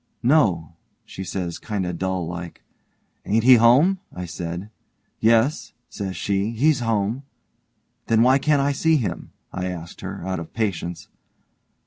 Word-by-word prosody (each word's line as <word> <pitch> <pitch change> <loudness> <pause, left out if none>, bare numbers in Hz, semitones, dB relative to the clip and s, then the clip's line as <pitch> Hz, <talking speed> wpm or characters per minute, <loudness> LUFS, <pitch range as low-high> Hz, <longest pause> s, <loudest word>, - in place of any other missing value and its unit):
'No', 100 - +2 0.3
she 95 - -7
says, 90 -2 -4
kind 105 -4 -3
o' 90 - -3
dull 95 0 -2
like. 85 0 -7 0.6
'Ain't 110 +2 +1
he 130 +1 +8
home?' 135 +12 +5 0.3
says 85 0 -5
I. 105 - -15 0.5
'Yes', 115 +6 +2 0.2
says 95 -2 -5
she, 100 +1 0
'he's 135 +5 +2
home'. 115 +1 0 0.9
'Then 115 0 +4
why 130 +2 +5
can't 145 -1 +2
I 140 - +2
see 160 +3 +2
him?' 120 - -3 0.2
I 90 0 -3
asked 85 -2 -7
her, - - -6
out 95 -2 -2
of 85 - -9
patience. 90 -6 -3
105 Hz, 145 wpm, -23 LUFS, 90-125 Hz, 0.9 s, he